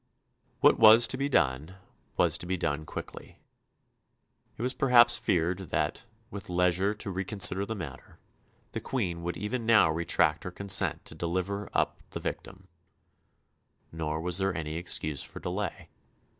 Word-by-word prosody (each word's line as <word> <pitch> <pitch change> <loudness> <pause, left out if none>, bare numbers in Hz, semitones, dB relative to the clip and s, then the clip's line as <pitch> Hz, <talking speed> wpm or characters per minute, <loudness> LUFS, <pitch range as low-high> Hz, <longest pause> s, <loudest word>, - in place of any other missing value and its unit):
What - - +5
was 115 +1 +8
to - - +2
be 140 +1 -2
done 75 - 0 0.4
was - - +2
to 90 - -8
be 95 +1 -1
done 80 -3 -2
quickly. - - -9 1.2
It 115 - -5
was 130 +1 0
perhaps 120 -3 +4
feared 90 +2 -1
that, 75 +8 -2 0.3
with 100 -3 -8
leisure 90 +3 +1
to 105 -1 -6
reconsider 95 +1 +3
the 110 - -4
matter, 90 -6 -9 0.5
the - - -5
Queen 90 -10 -3
would 85 +1 -4
even 110 +4 -3
now 110 -8 +5
retract 85 +2 +1
her - - -5
consent 100 +2 0
to - - -7
deliver 95 +4 -3
up - - -1
the - - -6
victim; 95 -1 -7 1.2
nor 80 -1 -3
was 90 +2 0
there 95 -3 -1
any 80 -1 -4
excuse 80 -3 -3
for - - -9
delay. 95 +2 -5
95 Hz, 150 wpm, -28 LUFS, 85-105 Hz, 1.2 s, was